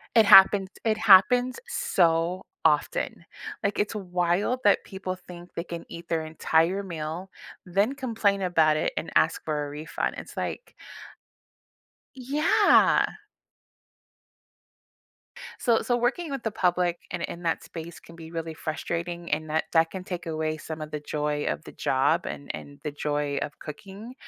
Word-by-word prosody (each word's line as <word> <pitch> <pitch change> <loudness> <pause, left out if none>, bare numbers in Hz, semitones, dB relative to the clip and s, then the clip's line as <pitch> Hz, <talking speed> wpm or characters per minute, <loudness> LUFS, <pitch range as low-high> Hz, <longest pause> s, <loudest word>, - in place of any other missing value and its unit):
It 225 -2 +7
happened 195 -1 +8
it 220 -1 +2
happens 225 +5 +5
so 175 - +1 0.2
often, 160 +2 +1 0.4
like, 200 - 0
it's 210 +2 0
wild 180 +5 0
that 205 - +4
people 190 -1 -5
think 180 -1 -12
they 170 - -3
can 170 -2 -7
eat 170 0 -10
their 160 -1 0
entire 165 +4 +1
meal, 170 +2 -5 0.4
then 200 +9 +1
complain 225 -7 0
about 160 -4 +3
it - - 0
and - - -3
ask 160 - +3
for 150 -2 -2
a - - -7
refund, 150 +2 -3
it's - - -9
like - - -4 1.4
Yeah. 280 +5 +4 2.5
So 235 -3 +2
so, 245 - +1
working 285 +7 -1
with 275 -3 -4
the 225 - -1
public 180 -3 +1
in 175 - -4
in 175 - -5
that 165 -1 -1
space 170 0 -9
can 165 - -15
be 160 -1 -10
really 165 -1 -5
frustrating, 170 +2 -4
and 155 +1 -1
that 160 +1 +1
that 165 -1 +4
can 190 - -6
take 180 -2 -6
away 155 -1 -2
some 155 0 -7
of 155 - -6
the 150 - -4
joy 150 0 -2
of 75 0 -2
the - - -10
job 145 +6 +1
and 140 - -6
and 145 0 -9
the 150 - -3
joy 145 -1 -2
of 150 - -6
cooking, 200 - -9
170 Hz, 155 wpm, -26 LUFS, 155-200 Hz, 2.5 s, happened